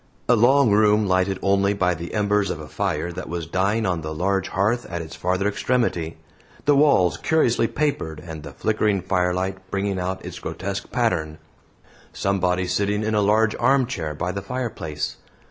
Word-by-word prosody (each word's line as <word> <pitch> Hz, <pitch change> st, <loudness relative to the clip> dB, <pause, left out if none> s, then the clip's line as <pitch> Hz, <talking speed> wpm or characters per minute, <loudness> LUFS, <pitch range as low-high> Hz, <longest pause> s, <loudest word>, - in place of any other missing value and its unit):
A 120 Hz, -, +5 dB
long 125 Hz, +1 st, +5 dB
room 105 Hz, 0 st, +4 dB
lighted 95 Hz, +1 st, +1 dB
only 100 Hz, 0 st, +2 dB
by 95 Hz, -2 st, +2 dB
the 85 Hz, +4 st, -6 dB
embers 105 Hz, -1 st, +1 dB
of -, -, -3 dB
a -, -, -8 dB
fire 85 Hz, -, -2 dB
that 85 Hz, -, -7 dB
was 85 Hz, -1 st, -3 dB
dying 100 Hz, +6 st, 0 dB
on 90 Hz, -3 st, 0 dB
the 80 Hz, 0 st, -5 dB
large 95 Hz, +3 st, 0 dB
hearth 110 Hz, +6 st, 0 dB
at 85 Hz, -, -4 dB
its 80 Hz, -1 st, -7 dB
farther 95 Hz, +2 st, 0 dB
extremity; 105 Hz, -8 st, -1 dB, 0.5 s
the 145 Hz, -, +5 dB
walls 95 Hz, -, +4 dB
curiously 120 Hz, -, +2 dB
papered, 125 Hz, -, -2 dB
and 80 Hz, -1 st, -8 dB
the 70 Hz, -2 st, -9 dB
flickering 105 Hz, 0 st, 0 dB
firelight 95 Hz, 0 st, -1 dB
bringing 100 Hz, -1 st, -1 dB
out 95 Hz, +1 st, -3 dB
its -, -, -7 dB
grotesque 100 Hz, +2 st, -5 dB
pattern; 85 Hz, -11 st, 0 dB, 0.8 s
somebody 95 Hz, -2 st, 0 dB
sitting 100 Hz, +3 st, 0 dB
in 110 Hz, 0 st, -1 dB
a 105 Hz, -, +3 dB
large 105 Hz, +2 st, +3 dB
armchair 120 Hz, -, +1 dB
by 90 Hz, +4 st, -2 dB
the 100 Hz, +2 st, -4 dB
fireplace. 100 Hz, -10 st, -4 dB
100 Hz, 170 wpm, -23 LUFS, 90-110 Hz, 0.8 s, A